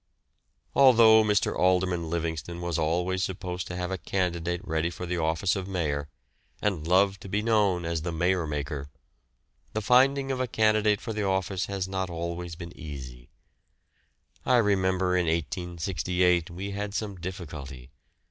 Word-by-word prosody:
Although 115 -5 +7
Mr. 105 -2 +1
Alderman 90 -2 +1
Livingston 85 0 -3
was 85 -1 -2
always 90 +4 0
supposed 90 -1 -4
to 90 - -5
have 90 0 -3
a 95 - -2
candidate 90 0 -2
ready 80 +1 0
for 85 +1 -6
the 90 0 -2
office 80 +4 +1
of 95 -1 -4
Mayor, 75 -6 -2 0.5
and 90 -7 -1
loved 95 +2 +3
to 100 - -9
be 105 +2 0
known 105 -6 +2
as 85 -1 -1
the 85 +2 -3
"Mayor 85 +1 +1
maker," 75 -1 -4 0.8
the 110 - -1
finding 135 +4 +4
of 130 - -2
a 130 - 0
candidate 110 -2 +2
for 115 - -4
the 105 - -2
office 95 0 -1
has 95 -2 -3
not 95 -1 -2
been 85 - -7
always 85 0 -4 0.2
easy. 65 -5 -9 1.1
I 125 - +4
remember 95 -4 +2
in 90 -2 +1
1868 85 +2 0
we 95 +4 -5
had 100 0 -4
some 100 -3 -3
difficulty. 75 -8 -7
90 Hz, 155 wpm, -27 LUFS, 85-100 Hz, 1.1 s, Although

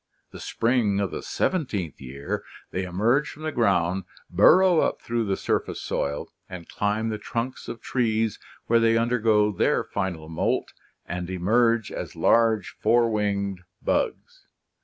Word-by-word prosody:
The - - -10
spring 115 -4 +1
of 100 -3 -1
the - - -5
seventeenth 105 - -2
year 70 +2 -5 0.3
they 95 0 -2
emerge 115 +11 +1
from 155 - -11
the 155 - -2
ground, 95 - +1 0.3
burrow 175 - +6
up - - +1
through 115 -1 -2
the 95 -1 -1
surface - - -1
soil 70 +1 -3 0.2
and 90 -3 -8
climb 105 +2 -1
the 110 -1 -3
trunks 120 +4 -4
of 115 - -7
trees, 115 -4 0 0.3
where 115 0 +4
they 115 0 +3
undergo 110 -3 +2
their 100 - +1
final 90 -6 -4
moult 80 0 -1 0.3
and 90 0 -5
emerge 115 +5 +2
as - - -6
large 115 -3 +3
four 115 +1 +3
rwinged 100 -3 -1 0.2
bugs. - - -2
110 Hz, 145 wpm, -25 LUFS, 95-120 Hz, 0.3 s, burrow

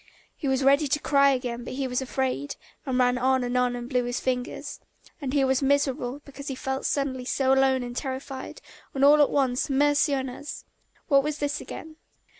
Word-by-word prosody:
He 285 - -4
was 265 0 +1
ready 280 +2 +4
to 295 +2 +1
cry 280 -2 +4
again 245 -3 -2
but - - -6
he 270 0 -1
was 250 +1 -1
afraid, 255 - -2 0.3
and 255 -1 0
ran 250 0 +3
on 260 0 +2
and 245 0 -2
on 250 -1 +2
and 240 0 -6
blew 250 -1 0
his 245 0 -2
fingers. 250 -1 -3 0.4
And 270 -2 -3
he 280 -1 +2
was 265 0 +2
miserable 275 -1 0
because 280 0 -10
he 270 - -3
felt 265 +1 -3
suddenly 270 -3 -1
so 265 +1 +2
lonely 265 -1 +3
and 240 0 -7
terrified, 265 - -5 0.3
and 270 +1 +4
all 295 +1 +7
at 290 - +5
once, 260 -2 +1
mercy 290 +1 +3
on 265 -1 -2
us! 260 +3 -8 0.4
What 275 -3 +5
was 300 +1 -3
this 290 0 -2
again? 315 -1 -9
265 Hz, 205 wpm, -26 LUFS, 250-280 Hz, 0.4 s, all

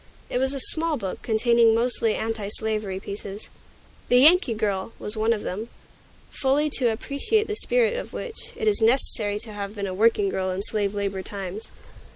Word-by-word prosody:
It 250 - 0
was 265 +1 0
a - - -3
small 315 +3 -1
book, 195 -6 -5
containing 230 0 +3
mostly 230 -2 +1
Antislavery 215 -2 -1
pieces. 200 +1 -7 0.6
"The 245 - +5
Yankee 295 - +6
Girl" 205 -1 -2
was 210 - 0
one 220 +1 +1
of 220 -3 -1
them, 215 +6 -4 0.6
fully 285 +3 +1
to 245 -3 +3
appreciate 280 - 0
the 425 - -3
spirit 485 +1 +1
of - - -5
which, 455 - -6
it 440 - -3
is 420 - +3
necessary 220 -3 +2
to 220 - -5
have 200 0 -6
been 200 -1 -3
a 190 - -4
working 210 0 +3
girl 190 0 -2
in 185 +2 -3
slave 205 -1 0
labor 200 -1 -2
times. 195 +2 -6
220 Hz, 180 wpm, -24 LUFS, 200-265 Hz, 0.6 s, Yankee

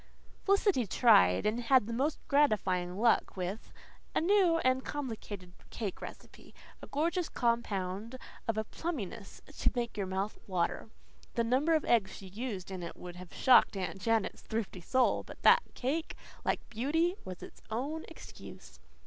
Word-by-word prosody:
Felicity 395 - +3
tried 180 - +5
and 215 +3 +1
had 250 -1 +4
the 230 - -4
most 280 +6 0
gratifying 190 -11 +2
luck 230 -2 +2
with 185 +4 -4 0.4
a - - +4
new 360 -1 +4
and 255 0 +2
complicated 215 -10 -6 0.2
cake 205 -5 -5
recipe - - -11 0.3
a - - -9
gorgeous 335 +4 0
compound 225 -1 -1 0.3
of 225 -1 0
a 220 - +1
plumminess 225 - -6
to - - +2
make 240 -1 -2
your 200 -3 -2
mouth 190 +3 -3
water. 185 +3 -1 0.5
The 235 - +2
number 270 +8 +2
of 310 - 0
eggs 200 -5 +2
she 190 - -10
used 200 -3 -5
in 185 -1 -5
it 170 - -7
would 180 0 -9
have 180 -1 -10
shocked 250 -5 +5
Aunt 190 0 -4
Janet's 225 +1 0
thrifty 220 -5 -4
soul, 255 +8 +2
but - - -13
that - - +7
cake, 300 +6 -2 0.3
like - - -1
beauty, 305 +10 +1
was 185 -1 -8
its - - -12
own 280 +8 -3
excuse. 325 - -12
230 Hz, 155 wpm, -32 LUFS, 190-275 Hz, 0.5 s, that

